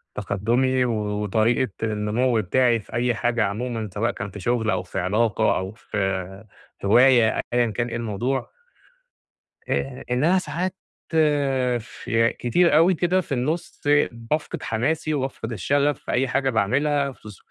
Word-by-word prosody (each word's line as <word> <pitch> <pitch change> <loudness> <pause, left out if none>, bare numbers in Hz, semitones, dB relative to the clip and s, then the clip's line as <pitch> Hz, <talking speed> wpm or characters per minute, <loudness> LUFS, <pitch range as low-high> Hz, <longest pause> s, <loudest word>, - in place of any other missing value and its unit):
تقدمُي 120 +6 +1
و 120 - 0 0.3
وطريقة 110 +3 +1
النمو 110 +2 +1
بتاعي 120 +4 +2
في - - -15
أي 120 -1 +1
حاجة 120 +1 +1
عمومًا 110 +1 -3
سواء 115 +3 0
كان 100 0 -6
في 100 - -9
شغل 110 +2 0
أو 90 - 0
في 90 - -5
علاقة 110 +4 +1
أو 95 +1 -4
في 95 -2 -4 0.4
هواية 120 +1 +5
أيًا 120 -2 +2
كان 120 +3 -2
إيه 115 - -5
الموضوع. 115 +4 -2 1.2
آآ 130 -1 -2
إن 125 +3 +1
أنا 180 +4 +4
ساعات 185 +1 -3 0.3
ف 165 - -1 1.2
كتير 160 +7 +3
أوي 175 +3 +5
كده 180 +2 +1
في 170 - -16
النُص 145 +6 -2 0.3
بافقد 115 +7 -4
حماسي 155 +8 -1
وبافقد 130 -4 -3
الشغف 140 +8 +1
في - - -6
أي 130 +2 +1
حاجة 135 +1 0
باعملها 140 +6 +1
في 115 -4 -13
ظ 100 - -12
120 Hz, 145 wpm, -23 LUFS, 105-135 Hz, 1.2 s, هواية